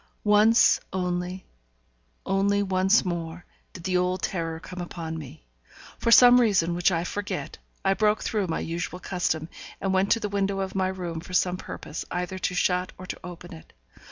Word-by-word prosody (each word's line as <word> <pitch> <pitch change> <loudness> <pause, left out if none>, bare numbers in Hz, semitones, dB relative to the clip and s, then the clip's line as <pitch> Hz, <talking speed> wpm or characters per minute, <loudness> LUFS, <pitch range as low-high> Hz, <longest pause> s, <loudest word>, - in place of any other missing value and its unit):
Once 210 +2 +5
only, 180 0 -3 0.8
only 200 +1 +2
once 190 +2 +3
more, 170 -1 -4 0.3
did 170 - -11
the 185 +1 -1
old 180 +1 +1
terror 165 -3 -2
come 180 +2 -8
upon 165 -2 -6
me. 130 - -9 0.5
For - - 0
some 245 +1 +8
reason 190 -7 +2
which 175 +2 +2
I 165 -1 0
forget, 205 +3 -5 0.3
I 195 - +4
broke 210 +1 +1
through 210 -4 -1
my 160 - -2
usual 170 +2 -4
custom, 175 -4 -2 0.3
and 195 -1 -1
went 190 +1 +2
to 230 - -1
the 215 - -2
window 200 -1 -1
of 190 0 -4
my 190 -1 +1
room 180 -3 -4
for 180 +3 -10
some 180 0 +2
purpose, 155 -3 -7
either 180 +1 -3
to 180 - -2
shut 180 0 +1
or 185 - -9
to - - -6
open 175 0 -9
it. 160 - -14
185 Hz, 180 wpm, -26 LUFS, 175-195 Hz, 0.8 s, some